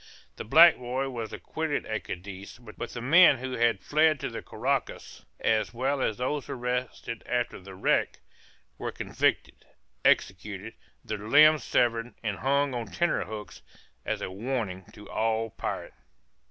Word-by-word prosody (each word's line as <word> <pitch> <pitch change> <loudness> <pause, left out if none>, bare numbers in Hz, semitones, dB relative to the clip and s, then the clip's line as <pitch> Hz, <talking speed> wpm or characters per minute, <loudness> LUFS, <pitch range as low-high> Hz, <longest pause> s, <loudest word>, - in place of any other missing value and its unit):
The - - -5
black - - +7
boy 125 +2 -3
was 115 -4 -5
acquitted 160 -2 -3
at 110 - -4
Cadiz, 95 +3 -8
but 120 -3 -14
the 120 - -7
men 155 +3 +7
who 130 +1 -5
had 115 -5 +1
fled 155 0 +3
to - - -2
the 115 - -5
Carraccas, 135 +4 -3
as 110 +1 +1
well 135 +3 0
as 110 - 0
those 135 +3 -2
arrested 125 -2 -3
after 120 -1 -1
the 95 0 -11
wreck, 95 - +1 0.6
were - - -3
convicted, - - -1 0.4
executed, 100 +3 0 0.3
their 110 -1 -4
limbs 150 +8 +6
severed, 115 0 +1
and 105 -3 -2
hung 140 +1 +1
on 120 -3 -3
tenter 175 - 0
hooks, 105 -2 -8 0.4
as - - -3
a - - -4
warning 100 -3 -3
to 105 - -12
all 115 0 -1
pirates. - - -5
120 Hz, 150 wpm, -28 LUFS, 105-135 Hz, 0.6 s, black